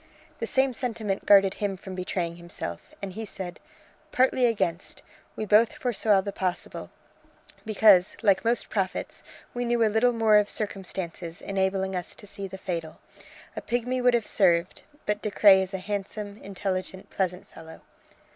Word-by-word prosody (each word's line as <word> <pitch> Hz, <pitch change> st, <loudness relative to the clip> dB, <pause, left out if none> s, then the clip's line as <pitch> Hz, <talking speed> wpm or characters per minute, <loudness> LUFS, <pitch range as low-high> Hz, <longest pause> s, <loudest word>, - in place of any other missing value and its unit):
The -, -, -2 dB
same 265 Hz, -1 st, +2 dB
sentiment 220 Hz, -5 st, -3 dB
guarded 195 Hz, -1 st, +6 dB
him 200 Hz, -2 st, -3 dB
from 190 Hz, +1 st, -9 dB
betraying 180 Hz, -2 st, -3 dB
himself, 170 Hz, -, -7 dB
and 190 Hz, -2 st, -4 dB
he 225 Hz, -, -5 dB
said: 190 Hz, -4 st, -7 dB, 0.5 s
"Partly 255 Hz, -1 st, +3 dB
against. 180 Hz, -6 st, -2 dB, 0.3 s
We 215 Hz, -, -3 dB
both 215 Hz, +2 st, +4 dB
foresaw 215 Hz, -5 st, +2 dB
the 200 Hz, -, -4 dB
possible 185 Hz, -2 st, -4 dB, 0.8 s
because, 210 Hz, -4 st, +5 dB
like 195 Hz, -3 st, +4 dB
most 235 Hz, +1 st, +1 dB
prophets, 190 Hz, -3 st, -2 dB, 0.3 s
we 245 Hz, -, -2 dB
knew 235 Hz, -1 st, +2 dB
a 215 Hz, -, 0 dB
little 240 Hz, +3 st, +4 dB
more 220 Hz, -2 st, +4 dB
of 210 Hz, 0 st, +2 dB
circumstances 185 Hz, -4 st, -4 dB
enabling 190 Hz, -1 st, -1 dB
us 180 Hz, -1 st, -5 dB
to -, -, -13 dB
see 200 Hz, -1 st, -6 dB
the 190 Hz, -, -8 dB
fatal. 165 Hz, -4 st, -5 dB, 0.6 s
A -, -, -4 dB
pigmy 245 Hz, +2 st, -1 dB
would 250 Hz, -1 st, +4 dB
have 230 Hz, -2 st, 0 dB
served, 175 Hz, -3 st, +2 dB, 0.2 s
but 210 Hz, 0 st, -1 dB
De 210 Hz, -, -2 dB
Craye 195 Hz, -1 st, +6 dB
is 190 Hz, 0 st, -3 dB
a -, -, -1 dB
handsome, 205 Hz, +1 st, -5 dB
intelligent, 190 Hz, -1 st, -4 dB
pleasant 185 Hz, -1 st, -2 dB
fellow." 160 Hz, 0 st, -12 dB
200 Hz, 160 wpm, -26 LUFS, 185-220 Hz, 0.8 s, guarded